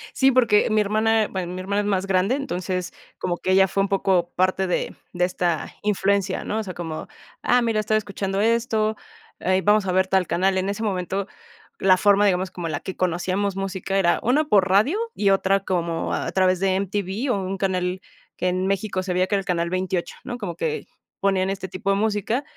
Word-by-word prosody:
Sí, 270 0 +4
porque 235 -4 +4
mi 215 0 +3
hermana, 215 +1 +2
bueno, 180 -2 -4
mi 185 - -5
hermana 200 +2 0
es 205 - -3
más 195 -1 0
grande, 195 +6 +2
entonces, 185 -8 -3 0.2
como 175 -1 -2
que 185 - -1
ella 190 0 +5
fue 195 - 0
un 200 - -2
poco 190 -3 +1
parte 185 +1 +1
de 180 - -2 0.2
de 180 0 +2
esta 175 -3 -2
influencia, 200 -2 +1
¿no?, 220 - -2
o - - -2
sea, 185 -2 -6
como: 160 -2 -6 0.3
"Ah, 245 0 +3
mira, 225 -2 +1
estoy 215 +1 +1
escuchando 195 -1 -2
esto, 220 -1 +1 0.4
eh, 185 +1 +1
vamos 210 0 +4
a 185 - 0
ver 190 +1 +2
tal 190 -2 +2
canal". 190 +3 +1
En 190 +1 0
ese 205 +3 -3
momento, 190 0 -2 0.5
la 185 -1 +5
forma, 205 +1 +4
digamos, 185 -1 +1
como 175 -2 -5
la 155 - -2
que 190 - -6
conocíamos 185 +2 -1
música 195 0 -2
era 175 -3 +3
una 290 +6 +2
por 195 -8 +3
radio 215 - +3 0.2
y 200 -2 +2
otra 195 0 +2
como 170 -3 -2
a - - -2
través 185 -1 +2
de 190 -1 +1
M-T-V 200 +5 -2
o 200 - 0
un 190 +1 -3
canal 185 -1 -1 0.4
que 180 - -1
en 185 +1 -1
México 195 -1 -1
se 180 -1 -2
veía, 185 +1 +2
que 205 - 0
era - - +2
el 195 - -6
canal 170 -1 0
28 185 -1 -2
¿no?, 245 - -5
como 185 -7 -5
que 160 -3 -3 0.3
ponían 195 -1 +1
este 195 -1 -4
tipo 185 +2 -4
de - - +3
música 220 +5 0
190 Hz, 215 wpm, -23 LUFS, 185-205 Hz, 0.5 s, ella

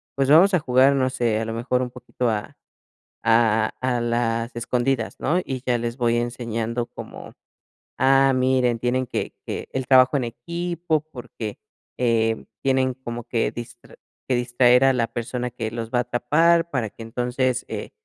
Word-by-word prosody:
pues 135 -1 +1
vamos 175 +7 +6
a 180 - +4
jugar, 135 -1 +4
no 130 -1 +1
sé, 120 -4 0
a - - -2
lo 115 - -4
mejor 125 +2 -1
un 125 - -2
poquito 125 -1 -3
a 105 -2 -4 0.7
a 115 -1 +3
a 130 -1 0
a - - -2
las 115 0 -1
escondidas", 120 0 -1
¿no?, 170 +5 +1
y 130 -1 -5
ya 125 -1 +2
les 120 +1 -4
voy 120 -2 +1
enseñando 120 0 -2
como: - - -10 0.6
"ah, 135 +1 +4
miren, 130 -2 +2
tienen 125 +2 0
que - - -3
que - - -4
el 130 -1 -3
trabajo 130 +1 +6
en 130 - -1
equipo, 170 +5 -2
porque, 110 -4 -7 0.4
eh, 115 -2 +1 0.2
tienen 130 -1 +2
como 120 -2 -7
que 115 0 -1
distra 120 0 -10 0.3
que 130 - +1
distraer 120 +1 +4
a 135 - +5
la 115 -2 0
persona 120 +2 -4
que 115 -2 -4
los 115 -1 -5
va 125 - +2
a - - -3
tapar 165 +7 +2
para 120 -6 -1
que 115 - -10
entonces, 125 +2 -1
eh, - - -5
125 Hz, 175 wpm, -23 LUFS, 115-130 Hz, 0.7 s, vamos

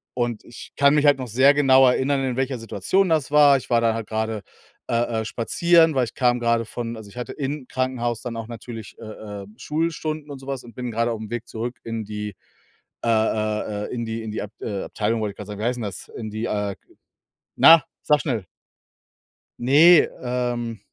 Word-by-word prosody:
und 120 -3 -2
ich 120 - -12
kann 140 0 +5
mich 150 - +3
halt 145 -1 +6
noch 130 - -5
sehr 130 +5 +5
genau 135 -2 +5
erinnern, 135 +2 +1
in 130 -2 -1
welcher 130 -1 -1
Situation 115 - 0
das 155 -3 +1
war, 145 -2 +7
ich 130 - -9
war 120 -1 +3
da 115 -1 +2
halt 115 -2 -5
grade, 110 -1 -2 0.4
äh 115 -1 0
äh, - - -5
spazieren, 160 +8 +3
weil 130 - +3
ich 115 - -10
kam 125 -1 +2
grade 115 -1 +1
von 115 +1 -5
also 105 -2 -10
ich - - -17
hatte 125 - -5
im 140 -1 -4
Krankenhaus 120 -3 -2
dann 120 -2 -5
auch 115 - -5
natürlich, 115 -1 -9
äh 115 - -9
äh, 105 -2 -8
Schulstunden 155 0 -3
und 140 - -7
so 135 - -13
was 135 -2 -4
und 120 - -14
bin 125 -1 -4
grade 115 +1 0
auf'm 110 -2 -5
Weg 120 0 -5
zurück 120 +2 -5
in 115 -1 -4
die, 105 -1 -6 0.7
äh - - -1
äh 110 -2 0
äh, - - -6
in 120 -1 -3
die 115 0 -4
in 110 - -5
die 105 - -4
Abt 105 +2 -10
äh, 100 -3 -3
Abteilung 110 +1 -1
wollte 105 -1 -2
ich - - -27
grad 105 - -7
sagen, 105 0 -7
wie - - -2
heißt 125 +1 0
denn 120 - -5
das? 100 -3 -6
In 110 -2 -6
die, 110 +2 -4
äh, 105 -3 -2 0.8
na! 165 -2 +8 0.2
Sage 150 -2 +3
schnell! 115 - -2 1.1
Ne, 150 +7 +6
ähm, 120 -3 -2
120 Hz, 215 wpm, -23 LUFS, 110-135 Hz, 1.1 s, na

